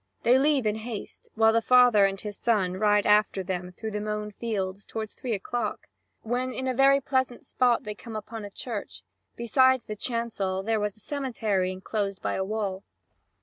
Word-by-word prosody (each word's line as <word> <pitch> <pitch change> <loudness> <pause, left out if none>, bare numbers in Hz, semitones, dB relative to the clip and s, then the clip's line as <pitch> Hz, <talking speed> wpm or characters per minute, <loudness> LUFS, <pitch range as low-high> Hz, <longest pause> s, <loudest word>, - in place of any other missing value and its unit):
They 250 +3 +5
leave 280 -3 +2
in 210 0 +1
haste, 220 -1 -7
while 225 0 +5
the 230 - +3
father 245 -4 +6
and 195 0 -4
his 210 0 -6
son 205 -7 +1
ride 205 +1 +2
after 210 -2 +3
them 180 -1 -4
through 220 +4 -6
the 210 0 -3
mown 210 0 -3
fields 200 -3 -3
until - - -19
toward 220 -1 -3
three 245 -3 -4
o'clock, 215 +2 -4 0.3
when 250 +3 -1
in 260 +1 -3
a 260 - +1
very 275 +2 +5
pleasant 260 -2 -1
spot 245 -2 +2
they 210 - -4
come 220 +2 -10
upon 215 +1 -6
a 205 - -6
church; 200 - -6 0.3
beside 260 +2 +3
the 215 - -6
chancel 210 -5 -2
there 220 +1 +1
was 210 0 -2
a - - -18
cemetery 220 -10 -1
enclosed 195 +1 -3
by - - -2
a 190 - -1
wall. 200 -2 -3
215 Hz, 190 wpm, -27 LUFS, 200-240 Hz, 0.3 s, father